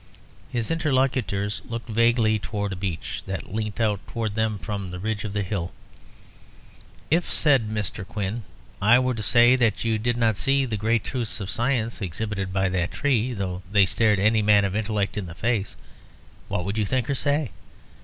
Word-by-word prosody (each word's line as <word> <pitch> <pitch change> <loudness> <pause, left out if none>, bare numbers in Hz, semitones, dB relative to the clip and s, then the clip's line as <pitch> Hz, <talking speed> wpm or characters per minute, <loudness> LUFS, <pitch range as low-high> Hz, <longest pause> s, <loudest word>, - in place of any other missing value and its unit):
His 120 +1 -2
interlocutors 130 - 0
looked 115 -1 -6
vaguely 115 -1 +3
towards 105 -1 -3
a - - -4
beech 90 -3 -4
that 95 0 -5
leant 110 0 -3
out 105 -3 +1
towards 115 -3 -3
them 110 -1 0
from 100 -1 -5
the 90 - -6
ridge 105 +2 -3
of 105 - -4
the 105 -1 0
hill. 90 -3 -3 1.4
"If," 170 +2 +2
said 135 -8 +3
Mr. 105 -3 -3
Quin, 105 +3 -3 0.4
"I 110 +5 +6
were 130 0 +1
to 110 - -4
say 120 +4 +6
that 115 -2 +1
you 110 -1 +1
did 120 +2 0
not 110 -3 +2
see 135 0 +2
the 115 -4 -2
great 110 +2 +1
truths 120 -8 -2
of 100 -2 -4
science 115 -2 0
exhibited 100 +1 -3
by 95 0 +1
that 90 -1 0
tree, 125 -3 0
though 95 -2 -3
they 100 -2 +6
stared 105 +1 +2
any 110 +2 +3
man 105 -1 +5
of 100 0 -2
intellect 105 -1 -1
in 95 - -5
the 80 - -9
face, 110 +1 -1 0.7
what 90 - -2
would 100 +3 -2
you 105 - +1
think 130 -1 0
or 140 - 0
say? 145 0 0
110 Hz, 185 wpm, -25 LUFS, 100-120 Hz, 1.4 s, I